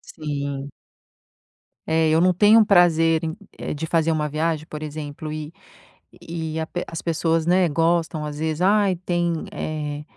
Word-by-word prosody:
Sim. 140 -2 -4 1.2
É, 160 0 +3
eu 160 +1 +3
não 180 +2 +4
tenho 210 +5 +6
um 220 - +5
prazer 165 -4 +4
em 160 0 -3 0.2
eh, - - -4
de 150 +2 -4
fazer 165 0 +2
uma 155 -1 0
viagem, 155 +1 -1
por 150 0 -6
exemplo, 150 0 -6
e 155 +1 -6 0.7
e 160 -1 -4
a 160 - -3
pe 175 - -4
as 165 - -6
pessoas, 165 -1 0
né, 180 0 +3
gostam 165 0 0
às 150 -1 -6
vezes: 160 +1 -2
"ai 200 -1 +3
tem, 175 -1 -1 0.2
eh, 150 -1 -4
160 Hz, 165 wpm, -23 LUFS, 155-170 Hz, 1.2 s, tenho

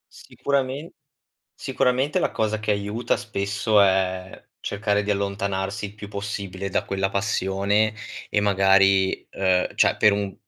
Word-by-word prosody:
Sicuramen 140 +2 -3 0.6
sicuramente 130 +6 0
la - - 0
cosa 110 -1 -1
che 110 -1 0
aiuta 105 +4 -1
spesso 105 -1 +1
è 95 -1 0
cercare 105 0 0
di 105 - -1
allontanarsi 100 0 -2
il 100 - -13
più 105 -1 -9
possibile 100 -1 -5
da - - -1
quella 95 0 -1
passione 100 +1 0 0.4
e 105 - +1
magari, 95 -1 +3
uhm, 95 -1 0
cioè - - +3
per 105 - +5
un 100 -1 -2
100 Hz, 130 wpm, -24 LUFS, 95-105 Hz, 0.6 s, per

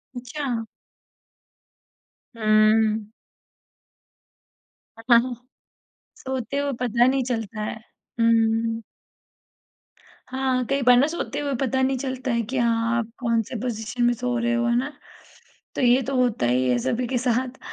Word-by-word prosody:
अच्छा। 245 -1 -4 1.7
हुँ। 215 0 +3 1.9
ह - - -9
हाँ, 240 +2 +5 0.8
सोते 265 0 -4
हुए 285 0 -1
पता 240 0 +3
नहीं 265 +1 +2
चलता 225 -3 -3
है। 210 - -4 0.4
हुँ। 225 0 +2 1.5
हाँ, 260 -1 -1
कई 275 +3 0
बार 250 -1 +6
ना 275 +4 +4
सोते 310 -3 -4
हुए 285 -1 -2
पता 265 0 +1
नहीं 265 0 +1
चलता 260 0 -3
है 235 0 +1
कि 265 - -2
हाँ 230 -1 +1
आप 235 -1 -2
कौन 230 -2 +1
से 250 - -8
पोज़िशन 230 -1 -3
में 240 0 +4
सो 245 +1 -2
रहे 235 0 0
हो, 235 0 +1
है 235 - +2
ना? 265 +3 -1 0.9
तो - - -1
ये 250 +1 +4
तो 270 +2 -3
होता 245 - +1
ही 125 +1 +2
है 125 - +3
सभी 240 - -1
के 255 +1 -1
साथ। 250 +1 -1
240 Hz, 140 wpm, -24 LUFS, 225-260 Hz, 1.9 s, बार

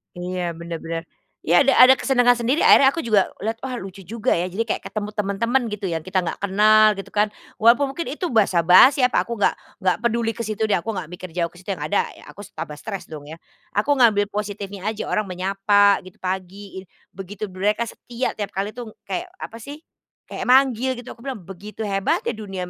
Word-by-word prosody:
Iya 180 -1 -4
benar 170 -1 -6
benar, 165 0 -5 0.4
ya 175 +2 +4
ada 275 0 +4
ada 255 +1 +8
kesenangan 245 -2 +3
sendiri, 255 +8 +1
akhirnya 270 - +7
aku 330 +5 0
juga 210 -4 +3 0.2
lihat 225 +1 -2
wah 260 -1 -5
lucu 195 -3 -8
juga 210 +4 -3
ya 175 +1 +1
jadi 190 +5 -2
kayak 225 - -3
ketemu 210 -1 -5
teman-teman 225 +5 0
gitu 210 -4 -4
yang 165 - -1
kita 185 -1 0
gak - - -4
kenal 215 +2 +4
gitu 195 - -9
kan, 210 0 +2 0.3
walaupun 240 +5 +4
mungkin 335 +5 -5
itu 355 +2 -3
basa-basi 200 - +5
apa, 250 - +2
aku 235 - -3
nggak 205 - +2 0.3
nggak 185 -1 +2
peduli 235 -1 0
ke 230 - -14
situ 215 0 -2
deh 215 - 0
aku 220 +5 -5
nggak 180 -3 -6
mikir 180 +1 -8
jauh 170 -2 -1
ke 175 - -17
situ 185 - -19
yang 150 - -7
ada 175 +7 0
ya - - -16
aku 205 -1 -11
tambah 155 -2 -6
stres 195 -6 -7
dong 145 -2 -9
ya, 155 - -8 0.4
aku 210 +8 +1
ngambil 215 -4 +5
positifnya 205 -1 -5
aja 220 0 -2
orang 215 -1 0
menyapa 195 +2 +2
gitu 185 - -14
pagi, 190 +1 -5 0.2
begitu 195 +2 -9
mereka 210 +5 0
setia 240 +2 -4
tiap 205 -2 -6
kali 195 +2 -2
tuh 230 -1 -9
kayak 355 +1 -4
apa 230 -10 -9
sih, 290 +7 -10 0.5
kayak - - -5
manggil 260 -1 +3
gitu 245 +1 -9
aku - - -13
bilang 255 -8 -5
begitu 200 +5 -8
hebatnya 195 -2 0
dunia 195 -4 -6
205 Hz, 205 wpm, -22 LUFS, 185-235 Hz, 0.5 s, ada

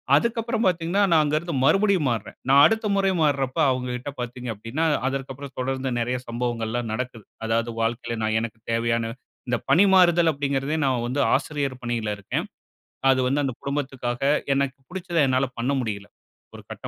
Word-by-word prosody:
அதுக்கப்புறம் 230 - 0
பாத்தீங்கனா, 175 +3 +1
நான் 160 -2 +5
அங்கருந்து 155 +2 -1
மறுபடியும் 195 -3 +3
மாறுறேன். 115 -4 -4
நான் 140 +1 +7
அடுத்த 220 -1 +2
முறை 195 -1 +2
மாறுரப்ப, 140 -3 +1
அவுங்ககிட்ட 125 +1 -3
பாத்தீங்க 125 0 -5
அப்படினா, 115 +10 -2 0.2
அதற்கப்புறம் 135 0 -5
தொடர்ந்து 130 +1 -2
நெறய 125 +2 -1
சம்பவங்கள்லாம் 120 -1 -2
நடக்குது. 120 -2 -5 0.2
அதாவது 115 +1 0
வாழ்க்கையில, 115 0 -2
நான் 110 0 +1
எனக்குத் 115 -1 -7
தேவையான 115 0 0 0.3
இந்த 120 0 +1
பணிமாறுதல் 175 -3 +5
அப்படிங்கிறதே 140 +1 -1
நான் 125 -3 +1
வந்து 130 +4 -2 0.2
ஆசிரியர் 140 -4 -2
பணியில 120 -3 -2
இருக்கேன். 100 - -3 0.6
அது 130 -1 +4
வந்து, 140 +3 +1
அந்த 130 - -2
குடும்பத்துக்காக, 130 -4 -3 0.3
எனக்கு 140 -1 -1
புடுச்சத, 180 -1 -4
என்னால 130 +1 +2
பண்ண 125 +4 0
முடியல. 105 -3 -4 0.5
ஒரு - - -10
கட்ட - - -7
130 Hz, 150 wpm, -24 LUFS, 120-155 Hz, 0.6 s, நான்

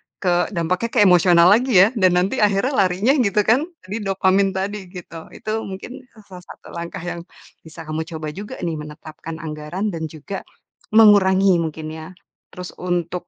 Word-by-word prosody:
ke 175 -2 0
dampaknya 180 +7 -1
ke 235 - +3
emosional 175 -1 +5
lagi 245 +3 +3
ya, - - +2
dan 185 -2 +4
nanti 190 +9 0
akhirnya 210 +6 +2
larinya 195 +9 +1
gitu 210 -3 +2
kan, 240 +6 +3 0.2
di 205 +4 -5
dopamin 195 0 +1
tadi, 195 0 -4
gitu. 170 -3 -10
Itu 215 +1 -4
mungkin 200 +8 -8 0.2
salah 185 -2 -12
satu - - -14
langkah 170 +1 -6
yang 175 0 -6 0.3
bisa 160 0 -11
kamu 155 +1 -3
coba 155 -1 -5
juga 205 +4 -8
nih 170 -2 -1
menetapkan 155 +1 -9
anggaran 155 +7 -4
dan 160 -1 -4
juga 160 +6 -7 0.5
mengurangi 195 -3 +6
mungkin 160 -1 -5
ya. 160 0 -8 0.5
Terus 180 -1 -8
untuk, 175 0 -3
180 Hz, 165 wpm, -20 LUFS, 165-200 Hz, 0.5 s, mengurangi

